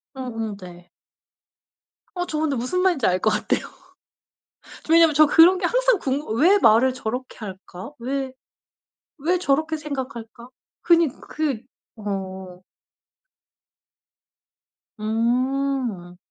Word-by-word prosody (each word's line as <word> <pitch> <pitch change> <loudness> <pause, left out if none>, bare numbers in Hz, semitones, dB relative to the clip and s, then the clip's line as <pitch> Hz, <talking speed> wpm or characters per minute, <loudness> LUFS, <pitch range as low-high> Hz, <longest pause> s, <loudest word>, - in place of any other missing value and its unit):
음음 225 -5 -5
네. 175 -2 -13 1.3
어 355 0 -2
저 305 - -3
근데 310 -3 0
무슨 255 +10 -1
말인지 350 - +2
알 185 0 +1
것 215 - +2
같아요. - - 0 1.2
저 320 - 0
왜냐면 330 -2 +6
저 310 +2 +7
그런 330 +5 +6
게 365 - -2
항상 - - +2
궁금 270 -4 -2
'왜 370 +7 +6
말을 235 +2 +4
저렇게 250 +1 -5
할까? 190 0 -9
왜 265 +2 -3 0.9
왜 340 +6 +1
저렇게 315 0 0
생각할까?' 255 -6 -7 0.3
그니 335 -1 +4
그 295 -7 -3 0.4
어. 190 -3 -6 2.4
음. 235 -3 -1
260 Hz, 190 characters per minute, -23 LUFS, 220-310 Hz, 2.4 s, 저